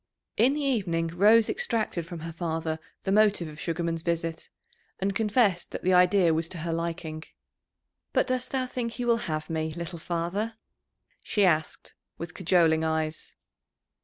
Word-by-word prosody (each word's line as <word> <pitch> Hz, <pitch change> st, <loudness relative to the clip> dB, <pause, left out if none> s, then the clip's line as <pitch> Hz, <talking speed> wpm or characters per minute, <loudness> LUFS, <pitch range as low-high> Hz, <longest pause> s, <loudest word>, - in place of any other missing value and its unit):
In 255 Hz, +6 st, +4 dB
the 300 Hz, -, -2 dB
evening 185 Hz, -11 st, 0 dB
Rose 210 Hz, +6 st, +5 dB
extracted 220 Hz, -, -1 dB
from 170 Hz, -2 st, -7 dB
her 165 Hz, 0 st, -6 dB
father 160 Hz, -1 st, -2 dB, 0.2 s
the 190 Hz, -, -1 dB
motive 205 Hz, -4 st, +3 dB
of 155 Hz, 0 st, -10 dB
Sugarman's 165 Hz, -1 st, -2 dB
visit, 165 Hz, -1 st, -2 dB, 0.5 s
and 195 Hz, +1 st, -1 dB
confessed 210 Hz, -3 st, +2 dB
that -, -, -6 dB
the 185 Hz, -, +3 dB
idea 180 Hz, -1 st, +5 dB
was 160 Hz, +1 st, 0 dB
to 180 Hz, -, -4 dB
her 165 Hz, -, -1 dB
liking. 165 Hz, -1 st, -4 dB, 0.9 s
"But -, -, +2 dB
dost 255 Hz, -1 st, -1 dB
thou 260 Hz, -1 st, -1 dB
think 245 Hz, -2 st, -4 dB
he 245 Hz, -, -4 dB
will 235 Hz, -1 st, +4 dB
have 155 Hz, 0 st, -2 dB
me, 160 Hz, -1 st, -2 dB
little 170 Hz, +1 st, -6 dB
father?" 175 Hz, +7 st, -2 dB, 0.7 s
she 205 Hz, -2 st, +2 dB
asked, 160 Hz, -3 st, 0 dB, 0.2 s
with 165 Hz, -1 st, -6 dB
cajoling 165 Hz, -3 st, +3 dB
eyes. 160 Hz, 0 st, -2 dB
170 Hz, 160 wpm, -27 LUFS, 165-210 Hz, 0.9 s, Rose